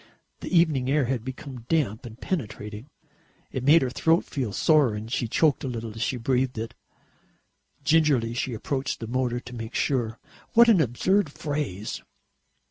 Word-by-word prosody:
The - - -6
evening 150 -6 +3
air 145 -1 +3
had 125 -2 -2
become 130 -1 -8
damp 135 -7 0
and 115 +1 -12
penetrating. 110 - -5 0.6
It 130 - -3
made 150 +4 +6
her 125 - -1
throat 165 +5 +2
feel 130 -7 -3
sore 140 - +3
and 110 +2 -7
she 120 - 0
choked 150 +5 +2
a - - -2
little 115 -3 -5
as 110 - -7
she 125 - 0
breathed 125 +1 0
it. 115 +2 -4 1.1
Gingerly 145 -7 +3
she 120 0 -2
approached 130 +4 -3
the 115 - -5
motor 120 +1 -1
to 125 0 -10
make 115 0 -7
sure. 120 -5 0 0.4
What 235 +1 +7
an 200 -7 +6
absurd 155 - +1
phrase! 145 - -4
130 Hz, 165 wpm, -26 LUFS, 115-150 Hz, 1.1 s, What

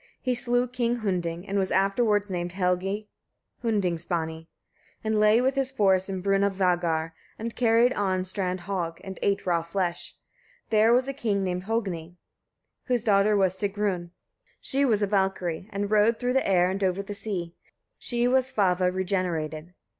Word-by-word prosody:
He 255 - 0
slew 245 0 +1
King 240 -1 -1
Hunding, 175 -1 -2
and 200 +1 0
was 190 - 0
afterwards 205 +1 +2
named 175 -1 -3
Helgi 190 +3 -1 0.6
Hundingsbani. 170 -6 -1 0.6
He 220 - -2
lay 215 +2 +4
with 260 +2 +2
his 270 -1 0
force 195 -6 +2
in 190 -2 -4
Brunavagar, 180 -5 +1 0.2
and 230 +1 -5
carried 235 +1 +4
on 185 -2 0
"strand 185 -1 -2
hogg" 175 -3 -3
and 190 -1 -8
ate 200 -1 0
raw 170 -2 +2
flesh. 175 +1 -3 0.6
There 220 +1 +5
was 250 +2 +3
a 275 - -2
king 215 -7 -1
named 180 0 -2
Hogni, 185 -7 -3 0.7
whose 245 -3 0
daughter 205 -1 +3
was 190 -2 +2
Sigrun: 200 -3 -2 0.5
she 275 0 0
was 215 -5 +2
a - - +4
Valkyria, 190 -4 -1
and 205 0 -3
rode 215 +2 +4
through 250 0 -1
the 265 - +1
air 180 -1 +3
and 195 +1 -3
over 190 +1 0
the 205 - -6
sea. 195 -5 -4 0.5
She 240 0 0
was 260 +1 +2
Svava 180 -3 +2
regenerated. 180 -3 -2
195 Hz, 160 wpm, -26 LUFS, 180-220 Hz, 0.7 s, There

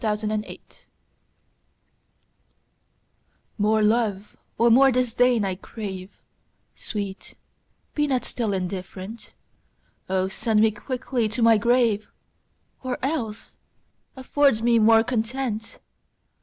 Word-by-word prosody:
Against 210 -1 -1
Indifference 215 0 -5 2.8
MORE 215 +1 +2
love 210 -2 0 0.2
or 235 0 +4
more 270 +3 +6
disdain 245 -2 +2
I 190 - -1
crave; 190 -1 -7 0.6
Sweet, 200 -3 -6 0.6
be 295 0 +1
not 260 -3 0
still 225 -4 -2
indifferent: 190 +3 -6 0.8
O 190 0 +1
send 215 +3 0
me 220 0 +4
quickly 240 +1 -2
to 225 +3 -2
my 225 -1 +6
grave, 235 -2 +2 0.7
Or 255 -1 -3
else 230 -7 -4 0.6
afford 265 -3 +2
me 235 -1 +4
more 225 +1 +5
content! 230 -1 -3
225 Hz, 100 wpm, -24 LUFS, 210-245 Hz, 2.8 s, more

